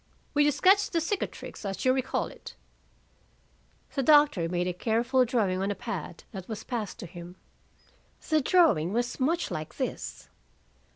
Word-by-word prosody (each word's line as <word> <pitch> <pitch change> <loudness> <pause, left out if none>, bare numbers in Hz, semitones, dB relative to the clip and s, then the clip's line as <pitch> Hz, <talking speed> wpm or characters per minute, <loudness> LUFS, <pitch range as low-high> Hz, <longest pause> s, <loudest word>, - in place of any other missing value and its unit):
"Will 295 - +3
you 295 - +5
sketch 390 +7 +4
the 335 - 0
cicatrix 355 - -4
as 195 +2 -4
you 255 - +5
recall 260 -1 -1
it?" - - -11 1.4
The 275 - 0
doctor 290 - +5
made 175 0 0
a 180 - -1
careful 235 +7 +2
drawing 205 -6 0
on 195 - 0
a 205 - -1
pad - - -6
that 190 -5 -8
was 220 -2 -6
passed 230 -6 -4
to - - -6
him. 175 +1 -10 0.9
The 310 -1 +3
drawing 260 - +3
was 240 +2 -1
much 325 +6 0
like 155 0 -5
this. 260 - -4
240 Hz, 160 wpm, -28 LUFS, 185-295 Hz, 1.4 s, you